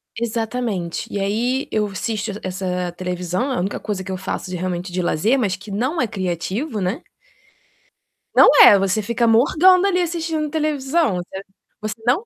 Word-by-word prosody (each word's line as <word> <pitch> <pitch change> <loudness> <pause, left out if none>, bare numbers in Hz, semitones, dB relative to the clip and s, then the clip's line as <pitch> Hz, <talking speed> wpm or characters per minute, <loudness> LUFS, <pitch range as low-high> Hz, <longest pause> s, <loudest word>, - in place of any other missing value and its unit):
Exatamente. 225 -6 -3
E 205 - -2
aí 235 +7 -1
eu 215 -1 +1
assisto 210 +2 -3
essa 180 -1 -3
televisão, 180 +7 -3
a 255 - -1
única 190 +3 -2
coisa 205 -3 -4
que 190 - -6
eu 185 - -3
faço 185 0 -5
de 180 - -4
realmente 180 0 -3
de 180 +1 -1
lazer, 195 - +1
mas 205 -7 0
que 195 +3 -13
não 260 - -1
é 245 - +1
criativo, 200 - -3
né? 185 - -2 1.3
Não - - +8
é, 205 - +9
você 195 +2 0
fica 235 +3 0
morgando, 350 - +5
ali, 365 -2 +1
assistindo 325 -3 -2
televisão, 300 - 0
você 190 +2 -7 0.4
você 215 0 -3
não 305 - +2
215 Hz, 165 wpm, -20 LUFS, 185-265 Hz, 1.3 s, é